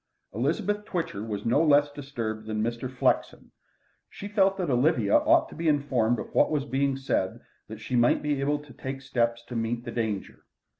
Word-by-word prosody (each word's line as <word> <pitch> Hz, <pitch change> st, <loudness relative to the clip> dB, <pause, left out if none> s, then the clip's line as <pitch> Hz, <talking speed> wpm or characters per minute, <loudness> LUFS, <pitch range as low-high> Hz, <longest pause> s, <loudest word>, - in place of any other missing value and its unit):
Elizabeth 190 Hz, -, -1 dB
Twitcher 165 Hz, -, -3 dB
was 105 Hz, -2 st, -5 dB
no 125 Hz, +7 st, +3 dB
less 145 Hz, -1 st, +4 dB
disturbed 115 Hz, -7 st, -5 dB
than 110 Hz, 0 st, -1 dB
Mr. 120 Hz, +2 st, -3 dB
Flexen. 130 Hz, -, 0 dB, 0.6 s
She 200 Hz, -, -8 dB
felt 195 Hz, -2 st, +2 dB
that 180 Hz, -7 st, -1 dB
Olivia 125 Hz, -5 st, +3 dB
ought -, -, +4 dB
to -, -, -11 dB
be 165 Hz, +1 st, -2 dB
informed 135 Hz, -6 st, +2 dB
of -, -, -7 dB
what -, -, +4 dB
was 150 Hz, -3 st, -1 dB
being 135 Hz, 0 st, 0 dB
said 115 Hz, -8 st, -1 dB, 0.3 s
that 110 Hz, 0 st, -9 dB
she 115 Hz, +3 st, -4 dB
might 120 Hz, 0 st, +3 dB
be 145 Hz, -2 st, 0 dB
able 145 Hz, +2 st, +1 dB
to 145 Hz, -2 st, -13 dB
take 135 Hz, 0 st, -6 dB
steps 120 Hz, -2 st, -1 dB
to 120 Hz, -, -8 dB
meet 115 Hz, +1 st, -2 dB
the 120 Hz, -, -5 dB
danger. 110 Hz, -4 st, -3 dB
130 Hz, 190 wpm, -27 LUFS, 115-145 Hz, 0.6 s, less